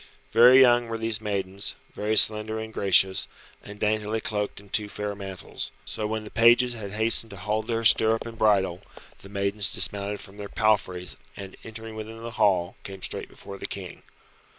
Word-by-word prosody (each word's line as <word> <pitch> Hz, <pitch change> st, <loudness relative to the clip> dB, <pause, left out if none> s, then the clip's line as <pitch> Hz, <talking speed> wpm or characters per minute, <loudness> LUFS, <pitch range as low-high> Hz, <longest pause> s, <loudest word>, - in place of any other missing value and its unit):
Very 125 Hz, +3 st, +7 dB
young 120 Hz, -2 st, +5 dB
were 115 Hz, 0 st, -4 dB
these 115 Hz, -1 st, -2 dB
maidens, 100 Hz, -2 st, -1 dB, 0.2 s
very 105 Hz, +1 st, -1 dB
slender 110 Hz, 0 st, +4 dB
and 110 Hz, 0 st, -7 dB
gracious, 95 Hz, -1 st, +3 dB, 0.3 s
and 105 Hz, 0 st, -11 dB
daintily 110 Hz, +1 st, 0 dB
cloaked 105 Hz, -2 st, -3 dB
in 100 Hz, 0 st, -17 dB
two 105 Hz, +1 st, -1 dB
fair 105 Hz, 0 st, -4 dB
mantles. 95 Hz, -2 st, -7 dB, 0.2 s
So 110 Hz, -, -4 dB
when 110 Hz, 0 st, -3 dB
the 105 Hz, -, -11 dB
pages 120 Hz, +2 st, +5 dB
had 100 Hz, -4 st, -7 dB
hastened 110 Hz, +1 st, +1 dB
to 100 Hz, -, -10 dB
hold 105 Hz, +3 st, -2 dB
their 115 Hz, -1 st, -1 dB
stirrup 110 Hz, +1 st, +5 dB
and 115 Hz, -1 st, -8 dB
bridle, 95 Hz, -5 st, +2 dB, 0.4 s
the 100 Hz, -, -13 dB
maidens 100 Hz, +1 st, 0 dB
dismounted 100 Hz, 0 st, -1 dB
from 100 Hz, +1 st, -11 dB
their 100 Hz, -1 st, -7 dB
palfreys 100 Hz, -5 st, 0 dB, 0.2 s
and 95 Hz, -1 st, -9 dB
entering 110 Hz, 0 st, -8 dB
within 110 Hz, +1 st, -8 dB
the 115 Hz, -, -6 dB
hall 95 Hz, -6 st, +1 dB
came 95 Hz, -1 st, -9 dB
straight -, -, -3 dB
before 100 Hz, -1 st, -11 dB
the -, -, -4 dB
King. 95 Hz, -3 st, -8 dB
105 Hz, 180 wpm, -25 LUFS, 100-110 Hz, 0.4 s, Very